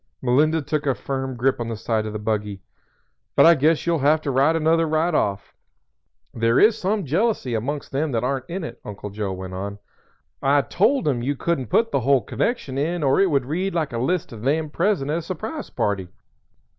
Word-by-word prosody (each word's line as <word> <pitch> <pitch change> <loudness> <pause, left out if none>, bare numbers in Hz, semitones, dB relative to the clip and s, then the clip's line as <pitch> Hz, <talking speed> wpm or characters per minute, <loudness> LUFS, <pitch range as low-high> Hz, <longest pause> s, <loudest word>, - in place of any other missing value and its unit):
Melinda 150 +5 +2
took 150 0 -2
a 135 - +2
firm 135 0 -4
grip 130 +2 +1
on 120 - -3
the 115 -1 -4
side 110 0 -1
of 105 - -5
the - - -2
buggy. 105 -2 -3 0.7
"But - - +6
I 170 - +9
guess 155 +1 +2
you'll 170 -2 +1
have 150 +3 +3
to 145 - -2
write 140 +5 +3
another 165 +1 +2
right 160 +2 +1
off. 100 -8 -1 0.8
There 115 +1 +2
is 215 +1 +6
some 205 -2 -1
jealousy 165 - 0
amongst 140 +6 -3
them 145 +2 -1
that 115 - 0
aren't 130 0 -2
in 180 +1 -4
it," - - -8
Uncle 105 0 -7
Joe 100 -1 -3
went 95 0 -6
on. 100 +2 -5 0.6
"I 140 +1 +3
told 210 - +1
'em 130 -5 +1
you 140 +4 -1
couldn't 140 -3 -1
put 225 - +2
the - - +2
whole 135 +1 +3
connection 140 - -2
in 165 +3 -1
or 135 +3 +3
it 195 -1 +4
would 140 -5 +1
read 180 +7 -2
like 155 -6 -1
a 115 - -2
list 165 +7 -1
of 110 -3 -9
'them 150 +4 0
present' 170 -6 0
at 165 - 0
a - - -5
surprise 215 - -6
party. 100 -3 -1
140 Hz, 210 wpm, -23 LUFS, 120-165 Hz, 0.8 s, I